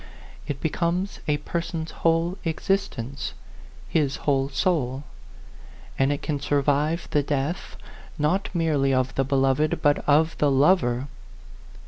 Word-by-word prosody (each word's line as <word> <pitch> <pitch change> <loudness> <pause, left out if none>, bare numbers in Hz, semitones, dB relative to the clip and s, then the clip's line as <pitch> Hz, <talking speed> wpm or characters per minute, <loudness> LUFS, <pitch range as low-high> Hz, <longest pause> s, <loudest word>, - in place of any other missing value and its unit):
It 140 -2 -3
becomes 170 +5 -1
a 150 -1 +2
person's 165 +1 -4
whole 165 +2 +1
existence, 160 - -2 0.5
his 145 -4 +1
whole 135 -2 +2
soul; 135 -2 0 1.0
and 135 +1 +3
it 145 - -3
can 145 -2 -1
survive 145 +3 +1
the 145 - +3
death, 145 +4 -2 0.4
not 165 +6 +1
merely 150 -6 +1
of 130 0 0
the 135 - +1
beloved, 135 +2 +1
but 145 0 +4
of 155 +3 +4
the 145 - +4
lover. 135 -3 +3
145 Hz, 120 wpm, -25 LUFS, 135-165 Hz, 1.0 s, but